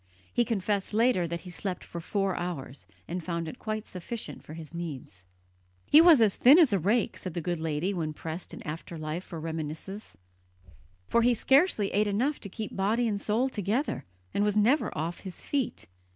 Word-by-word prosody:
He 240 - +3
confessed 205 -2 -1
later 220 -6 +3
that 170 0 -4
he 180 - -10
slept 185 0 -4
for 170 - -7
four 195 +2 0
hours, 140 - -5 0.2
and 175 +1 -4
found 170 -1 -3
it 245 - -8
quite 215 -1 -4
sufficient 200 +6 -6
for 155 - -9
his 160 -1 -9
needs. 135 - -7 0.6
"He 305 - +8
was 330 -7 +8
as 210 -3 +4
thin 270 +6 +7
as 315 - +6
a 195 - +3
rake," 210 +6 +1
said 185 -3 -6
the - - 0
good 175 0 -2
lady 160 +4 -1
when 160 -4 -2
pressed 160 +3 -6
in - - -9
after 165 +2 -6
life 155 +3 -4
for 170 -4 -7
reminiscences, 160 +5 -6 0.9
"for 235 - +3
he 240 +1 +4
scarcely 265 - +3
ate 210 +1 +2
enough 250 +9 0
to 200 - -7
keep 215 +2 -6
body 220 +5 +1
and 205 -2 -1
soul 225 +5 +1
together, 230 - -1 0.3
and 205 - +2
was 210 0 +1
never 245 +9 +3
off 165 +3 -3
his 190 -3 -7
feet." 275 -4 -2
195 Hz, 195 wpm, -29 LUFS, 165-225 Hz, 0.9 s, He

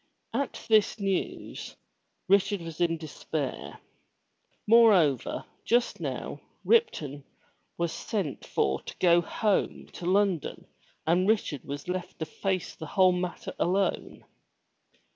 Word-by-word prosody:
At 280 - -3
this 215 -1 +3
news, 195 -2 -3 0.5
Richard 200 0 +3
was 165 0 -7
in 165 -1 +2
despair. 155 -3 -5 0.9
Moreover, 205 - +4 0.2
just 240 +1 +1
now - - -4 0.2
Ripton 155 - +2 0.5
was 170 -1 0
sent 190 -10 -3
for 65 0 0
to - - -9
go 175 -1 +5
home 205 +4 0
to 175 - -6
London 190 -4 +1 0.4
and 175 +4 +3
Richard 205 - 0
was 140 +2 -6
left 180 0 -4
to 160 - -3
face 190 +2 -2
the 160 - -8
whole 185 +3 +4
matter 180 -1 -3
alone. 190 +2 0
180 Hz, 115 wpm, -28 LUFS, 160-200 Hz, 0.9 s, go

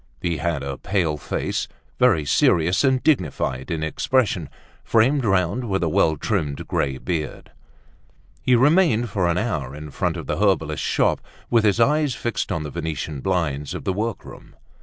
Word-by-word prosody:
He 85 +1 -1
had 80 -1 -2
a 70 -1 -5
pale 85 -6 0
face, 75 - -3 0.3
very 80 -2 +4
serous 85 - +3
and 130 -2 +2
dignified 75 - 0
in 80 -2 -2
expression, 105 - 0 0.3
framed 130 +5 +3
round 95 +3 +1
with 95 -2 0
a 85 - +1
well 80 0 +2
trimmed 75 -7 -2
grey 70 -2 -1
beard. 80 0 -4 0.9
He 125 - +3
remained 125 - +3
for 95 -3 +1
an 85 0 +1
hour 80 - -2
in 75 0 -8
front - - -1
of - - -7
a - - -1
herbalist's - - +1
shop - - +1 0.3
with 115 -2 +4
his 105 +1 +2
eyes 145 +2 +2
fixed 120 - -3
on 80 - -2
the 75 - -6
Venetian 80 -2 -4
blinds 75 -6 -1
of - - -6
the 95 - -1
workroom. 110 +2 -5
90 Hz, 165 wpm, -22 LUFS, 75-115 Hz, 0.9 s, very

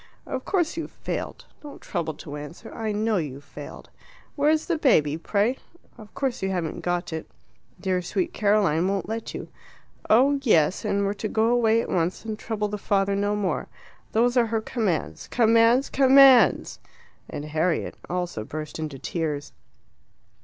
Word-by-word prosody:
Of 260 -2 -5
course 345 -4 0
you've 330 - -4
failed - - -5 0.2
don't 290 -1 -10
trouble 165 -4 -3
to 145 0 -8
answer 150 +9 -9
I 220 -1 -3
know 215 +1 0
you've 145 -4 -4
failed. - - -11 0.4
Where's 305 +2 +2
the 335 -3 -1
baby, 155 - +3
pray? 205 +9 0 0.4
Of 215 -3 -13
course 270 -3 -2
you 190 - -1
haven't 175 -4 -2
got 175 -1 -2
it. 160 - -5 0.5
Dear 185 -1 0
sweet 335 - -2
Caroline 200 -5 +2
won't 195 0 -1
let 225 +1 -5
you. - - -7 0.6
Oh, 275 +5 +5
yes, 180 - +3
and 200 0 0
we're 200 - 0
to 210 +1 -4
go 220 +2 +1
away 230 -2 +3
at - - -7
once 180 +4 -1
and 220 -1 -4
trouble 215 -2 -2
the 210 0 -5
father 195 0 +1
no 205 +1 0
more. 205 -3 -2 0.5
Those 240 +3 +3
are 235 -2 +4
her 225 0 0
commands. 215 -8 -2
Commands! 230 +2 +4
COMMANDS!" 265 -4 +6 0.5
And 145 - -5
Harriet 155 +2 -1 0.2
also 175 -10 -3
burst 155 +6 -6
into 155 -3 -4
tears. 150 -1 -3
205 Hz, 160 wpm, -25 LUFS, 170-235 Hz, 0.6 s, COMMANDS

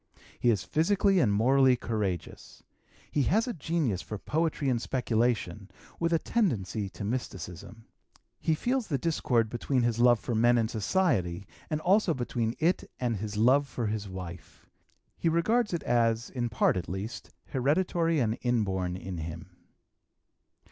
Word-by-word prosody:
He 120 - +3
is 105 -6 +2
physically 195 +4 +2
and 120 -10 +3
morally 130 +5 +4
courageous. 105 -7 -4 0.5
He 145 - +1
has 220 +7 +2
a 245 - -2
genius 150 - -1
for 105 - -6
poetry 155 +4 -1
and 120 -3 +1
speculation, 115 -6 -1 0.3
with 170 0 0
a 165 - +4
tendency 110 - -1
to 100 - -8
mysticism. 100 -2 -5 0.5
He 160 - +1
feels 250 +7 -1
the 145 - 0
discord 130 -6 +1
between 120 +3 -1
his 120 -1 0
love 120 -1 +5
for 120 - -4
men 120 +2 +4
and 115 -1 0
society, 105 - 0 0.4
also 190 -3 +3
between 120 -2 -2
it 170 +3 0
and 120 -3 0
his 105 +1 -5
love 130 +6 +4
for 120 -2 -4
his 105 -1 -3
wife. 90 -2 -9 0.5
He 165 - +2
regards 210 +8 +2
it 170 -3 -2
as, 115 -1 +1
in 120 -2 -2
part, 110 - +2
at 85 - -4
least, 95 +5 -5 0.2
hereditary 165 +4 +1
and 115 -3 0
inborn 95 -7 0
in 90 -1 -6
him. 80 +2 -7
120 Hz, 150 wpm, -29 LUFS, 105-155 Hz, 0.5 s, love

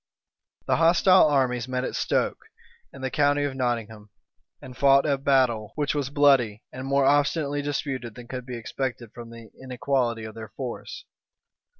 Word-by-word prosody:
The - - +1
hostile 175 +2 +5
armies 130 -4 +1
met 130 0 -2
at - - -4
Stoke, - - -1 0.5
in 135 - -12
the 130 - -2
county 145 0 +2
of 145 -2 -2
Nottingham, 115 -5 -3 0.5
and 125 - -11
fought 140 0 +4
a 145 -2 +2
battle, 130 -6 +1
which 145 -2 -1
was 145 -3 -2
bloody, 135 -7 +3
and 130 +1 -6
more 140 0 +2
obstinately 145 +1 +1
disputed 135 -5 -4
than 120 -1 -11
could 130 - -5
have 125 - -9
been 125 -1 -5
expected 120 -1 -5
from 120 -1 -10
the 115 -2 -13
inequality 125 -2 -1
of 110 0 -8
their 110 -1 -9
force. 315 - -7
130 Hz, 170 wpm, -25 LUFS, 120-145 Hz, 0.5 s, hostile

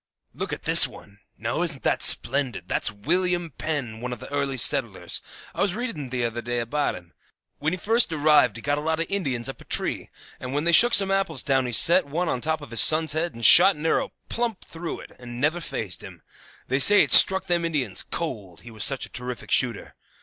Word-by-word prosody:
"Look - - -6
at - - -7
this - - +7
one. 100 0 -17 0.2
Now, - - -4
isn't - - -1
that - - -1
splendid? 140 -3 +2
That's - - 0
William 175 - -2
Penn, 135 -8 -4
one 125 +1 -6
of 120 - -7
the 130 - -12
early 140 -2 -3
settlers. 115 - +1 0.3
I - - -5
was 200 -2 -1
reading 215 - -6
t'other 120 -2 -4
day 120 +1 -5
about 145 +5 -3
him. 85 -1 -15 0.5
When 150 +2 -2
he 180 - -3
first 225 +1 0
arrived 150 -7 +2
he 115 - -10
got 145 +1 -1
a - - -7
lot 160 +1 -3
of 165 - -1
Indians 135 -12 -3
up 135 - -9
a - - -13
tree, - - -5 0.3
and 130 0 -8
when 145 +1 -2
they 170 - +1
shook 235 +8 +6
some 195 -1 +2
apples 195 -8 -2
down 135 -2 0
he - - -5
set 170 +7 +5
one 170 +5 -3
on 125 - -3
top 160 +1 -2
of 145 - -12
his 115 -3 +4
son's 155 -1 +5
head 165 0 -3
and 115 -1 -4
shot 190 +3 +7
an 150 +2 -9
arrow - - -1 0.2
plump 235 -4 -4
through 165 0 -8
it - - -15
and 120 -1 -10
never 155 +5 -1
fazed 105 - -5
him. - - -13 0.4
They 130 +2 -1
say 205 +9 +6
it - - -1
struck 190 0 +7
them 175 -2 -1
Indians 145 - -2
cold, 105 - -6
he 120 - -13
was 110 - -7
such 135 -2 +1
a - - -16
terrific 125 0 -8
shooter. 120 -5 -1
145 Hz, 225 wpm, -23 LUFS, 125-170 Hz, 0.5 s, this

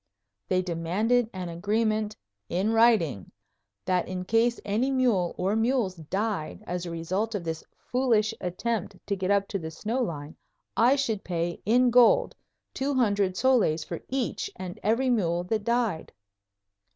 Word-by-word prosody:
They 185 0 +1
demanded 195 +8 +1
an 185 -2 -5
agreement 215 +4 0 0.3
"in 190 +5 0
writing" 215 - +3 0.5
that 180 -1 +1
in 185 0 -4
case 230 +4 +2
any 215 +6 +1
mule 240 -10 +1
or 190 +4 0
mules 225 -3 +1
died 190 +1 -3
as 180 0 -4
a - - -4
result 185 +7 -2
of 195 - -3
this 160 -1 -4
foolish 230 -4 +1
attempt 205 +3 -2
to 200 - -1
get 190 -1 -2
up 200 -1 +2
to 200 - -2
the 160 -2 -5
snow 220 +10 -2
line, 155 -8 -4 0.4
I 245 +4 +5
should 230 -8 -1
pay 170 -1 -3
in 245 +2 +4
gold 250 - +5 0.4
two 275 +1 -1
hundred 200 -6 +1
soles 220 -12 +3
for 170 +2 -6
each 260 -2 -2
and 180 -1 -7
every 240 +5 +2
mule 175 -7 +1
that 215 +3 -2
died. 235 -7 0
205 Hz, 150 wpm, -27 LUFS, 175-235 Hz, 0.5 s, I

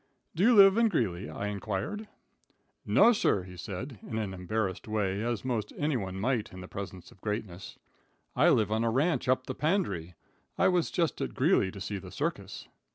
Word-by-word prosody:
"Do 165 - -3
you 235 +4 +6
live 195 +1 +8
at 230 -1 +4
Greeley?" 100 - -1
I 100 - -5
inquired. 105 - -3 0.8
"No, 240 - +6
sir," 100 - +1
he 90 0 -11
said, 100 - -6
in 110 - -5
an 105 -3 -2
embarrassed 95 +2 -3
way, 105 -2 -1
as 120 0 -2
most 115 -5 -2
anyone 115 -11 -1
might 120 0 -1
in 95 - -9
the 95 - -8
presence 95 -2 -8
of 90 - -20
greatness. 105 -4 -5 0.6
"I - - +5
live 105 -2 +3
on 110 +1 +1
a 115 - +2
ranch 140 +4 +1
up 130 0 +2
the 130 - -4
Pandre. 130 - -1 0.4
I - - +4
was 180 -2 +1
just 165 -3 -1
at - - -3
Greeley 95 - +3
to 100 - -9
see 100 +1 -4
the - - -10
circus." - - -4
110 Hz, 190 wpm, -29 LUFS, 95-140 Hz, 0.8 s, live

